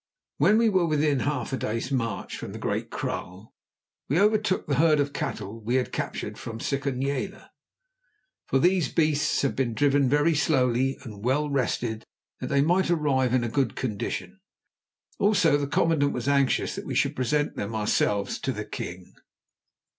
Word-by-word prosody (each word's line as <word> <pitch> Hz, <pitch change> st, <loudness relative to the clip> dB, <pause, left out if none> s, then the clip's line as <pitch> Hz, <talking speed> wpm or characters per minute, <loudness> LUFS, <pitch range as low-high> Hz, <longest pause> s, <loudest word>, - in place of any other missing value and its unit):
When 215 Hz, -, +4 dB
we 230 Hz, 0 st, +4 dB
were 185 Hz, -5 st, +2 dB
within 150 Hz, -2 st, +2 dB
half 140 Hz, -2 st, -2 dB
a -, -, 0 dB
day's 115 Hz, +4 st, -3 dB
march 115 Hz, -4 st, -2 dB
from -, -, -7 dB
the -, -, -6 dB
Great -, -, -2 dB
Kraal 95 Hz, +5 st, -5 dB, 0.6 s
we 150 Hz, +6 st, +2 dB
overtook 210 Hz, -1 st, +2 dB
the 140 Hz, -3 st, 0 dB
herd 155 Hz, 0 st, +4 dB
of 145 Hz, 0 st, 0 dB
cattle 110 Hz, -4 st, -4 dB
that 110 Hz, -, -18 dB
we 120 Hz, -, +1 dB
had 130 Hz, -1 st, +1 dB
recaptured -, -, -4 dB
from 115 Hz, -1 st, -6 dB
Sikonyela, 140 Hz, -, -2 dB, 1.0 s
for -, -, +2 dB
these 175 Hz, -2 st, +2 dB
beasts 155 Hz, -3 st, +1 dB
had 140 Hz, -, 0 dB
been 120 Hz, -4 st, -1 dB
driven 140 Hz, -1 st, +3 dB
very 145 Hz, +4 st, +3 dB
slowly 135 Hz, -3 st, +1 dB
and 105 Hz, -5 st, -10 dB
well 145 Hz, +4 st, +1 dB
rested 120 Hz, -4 st, -1 dB, 0.4 s
that -, -, -4 dB
they 140 Hz, 0 st, +2 dB
might 175 Hz, +5 st, +2 dB
arrive 140 Hz, -7 st, +2 dB
in 120 Hz, -2 st, +1 dB
good 120 Hz, -2 st, 0 dB
condition. 110 Hz, -6 st, -4 dB, 0.8 s
Also 190 Hz, -7 st, +4 dB
the 145 Hz, -1 st, 0 dB
commandant 155 Hz, -2 st, +2 dB
was 125 Hz, +1 st, -4 dB
anxious 140 Hz, -2 st, +2 dB
that -, -, -7 dB
we -, -, -3 dB
should -, -, +1 dB
present 145 Hz, +4 st, 0 dB
them 105 Hz, +2 st, -4 dB
ourselves 105 Hz, -1 st, 0 dB
to 135 Hz, -, -2 dB
the 105 Hz, -3 st, -5 dB
king. 90 Hz, -3 st, -7 dB
140 Hz, 170 wpm, -26 LUFS, 120-150 Hz, 1.0 s, When